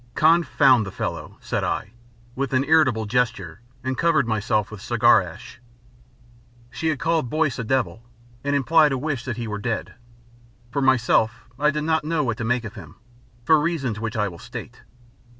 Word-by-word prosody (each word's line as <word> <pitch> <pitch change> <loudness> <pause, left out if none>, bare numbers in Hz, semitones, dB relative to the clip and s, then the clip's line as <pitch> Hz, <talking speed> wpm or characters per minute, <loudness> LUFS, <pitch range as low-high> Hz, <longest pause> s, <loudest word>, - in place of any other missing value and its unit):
"Confound 155 -6 +4
the 95 - -6
fellow," - - -5
said - - -2
I, 100 - -2 0.4
with 135 0 -3
an 130 +1 +3
irritable 140 -7 +3
gesture 105 -6 -1 0.2
and 130 0 -2
covered 165 -6 +2
myself 105 -2 0
with 110 -3 -9
cigar - - +4
ash. - - -11 1.1
She 160 +6 -3
had 155 -2 +1
called 160 -4 0
Boyce 155 -4 0
a - - -2
devil 120 -1 -1 0.4
and 145 0 0
implied 150 +2 +4
a - - -1
wish 140 -2 -3
that 120 -3 -4
he 120 -1 -4
were 105 -1 -4
dead. 115 +1 -3 0.8
For 140 +2 -1
myself 120 -3 +2
I 150 +1 +3
did 150 0 -2
not 160 -1 +1
know 155 0 0
what 115 -4 -2
to - - -4
make 120 +1 0
of 105 -1 -7
him, 90 -9 -12 0.5
for 155 +3 +5
reasons 140 -10 -2
which 115 +1 -4
I 105 -1 +1
will 85 -4 -9
state. - - -9
130 Hz, 180 wpm, -23 LUFS, 110-150 Hz, 1.1 s, for